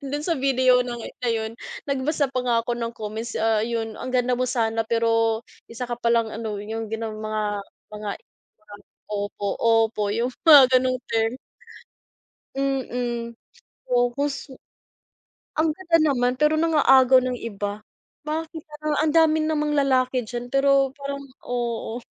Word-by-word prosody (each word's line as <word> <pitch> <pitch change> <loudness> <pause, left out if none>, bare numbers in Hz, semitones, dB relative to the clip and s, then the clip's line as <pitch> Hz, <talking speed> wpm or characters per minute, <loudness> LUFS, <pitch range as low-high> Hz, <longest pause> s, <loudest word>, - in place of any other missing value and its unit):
do'n 290 +2 -3
sa 345 - +1
video 260 -1 +4
ng 240 -1 -5 0.2
na 245 - 0
yun, 220 0 -2 0.4
nagbasa 280 +1 0
pa 255 - 0
nga 240 -2 +2
ako 240 - -1
ng 230 -1 -3
comments, 220 +2 -5
ah, 225 -1 +2
'yon, 225 -1 -3
"Ang 255 - -5
ganda 250 0 +2
mo 255 0 0
sana, 225 -2 0
pero 225 -1 +2 0.3
isa 230 +2 -5
ka - - -4
palang 235 -2 +2
ano", 220 -2 -4
yung 225 +1 -5
gano'ng 220 -1 -4
mga, 215 0 -2 0.5
mga 210 0 -6 1.0
opo, 205 0 -3
opo, 225 -2 +2
yung 235 +3 0
mga 295 -5 +10
ganong 255 0 0
term. 225 +2 0 1.2
Mm, 245 -3 -2 0.6
focus 260 +3 0 1.0
ang 315 0 +2
ganda 335 0 +1 0.2
naman, 245 -1 +1
pero 300 +2 +3
nang-aagaw 270 -5 +5
ng 250 -1 -2
iba. 205 -2 -4 0.5
Bakit 320 0 -4 0.2
ang, 305 - +1
ang 305 -1 +2
dami 315 -1 +4
namang 300 -1 0
lalaki 260 -3 +2
diyan, 245 +3 -6
pero 275 -1 +3
parang 280 0 -5 0.2
oo. 235 -2 -3
245 Hz, 140 wpm, -24 LUFS, 225-275 Hz, 1.2 s, mga